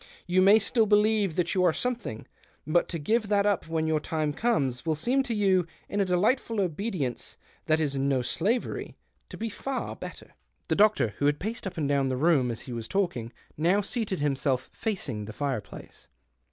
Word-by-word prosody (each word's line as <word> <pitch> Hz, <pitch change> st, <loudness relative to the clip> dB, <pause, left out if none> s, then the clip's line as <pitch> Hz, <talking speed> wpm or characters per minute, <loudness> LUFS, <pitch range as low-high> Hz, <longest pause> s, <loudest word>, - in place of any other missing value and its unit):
You 180 Hz, +1 st, +3 dB
nay 200 Hz, +3 st, +7 dB
still 220 Hz, +1 st, +2 dB
believe 210 Hz, -3 st, +3 dB
that 175 Hz, -1 st, 0 dB
you 185 Hz, -, +2 dB
are 175 Hz, -3 st, +4 dB
something; 240 Hz, -, -3 dB, 0.5 s
)ut 175 Hz, -, +3 dB
to 170 Hz, -, -2 dB
give 215 Hz, +8 st, 0 dB
that 200 Hz, -1 st, +2 dB
up 205 Hz, -5 st, +1 dB
when 160 Hz, -1 st, -1 dB
your 160 Hz, -1 st, +1 dB
time 155 Hz, -1 st, -2 dB
comes 140 Hz, -, 0 dB
vill 160 Hz, -1 st, 0 dB
seem 245 Hz, -, +1 dB
to 240 Hz, -4 st, -2 dB
you 190 Hz, -4 st, +2 dB
— -, -, -33 dB
in 205 Hz, -, -2 dB
a -, -, +2 dB
delightful 215 Hz, +5 st, +1 dB
obedience 180 Hz, -, -2 dB, 0.3 s
hat 155 Hz, 0 st, +3 dB
is 145 Hz, -3 st, -1 dB
no 135 Hz, -2 st, +1 dB
slavery 210 Hz, -, -1 dB
— -, -, -45 dB
to -, -, -9 dB
be 230 Hz, -, -3 dB
far 265 Hz, +5 st, -4 dB
better." -, -, -10 dB, 0.4 s
The -, -, +2 dB
doctor, 210 Hz, -, +4 dB
who 145 Hz, -, +3 dB
had 145 Hz, 0 st, +2 dB
paced 220 Hz, +2 st, -4 dB
up 185 Hz, -, -7 dB
and 150 Hz, -3 st, 0 dB
down 140 Hz, -1 st, +1 dB
lie 130 Hz, -, 0 dB
room 140 Hz, -3 st, +3 dB
as 115 Hz, -, -4 dB
he 125 Hz, -, -8 dB
was 115 Hz, -1 st, -5 dB
talking, 175 Hz, -, -1 dB, 0.3 s
now 175 Hz, +6 st, +3 dB
seated 205 Hz, -, -2 dB
him 145 Hz, -2 st, +1 dB
self, 130 Hz, -2 st, -1 dB
facing 140 Hz, -, -3 dB
the 110 Hz, -, -8 dB
fireplace. 135 Hz, -4 st, -5 dB
175 Hz, 205 wpm, -27 LUFS, 145-210 Hz, 0.5 s, nay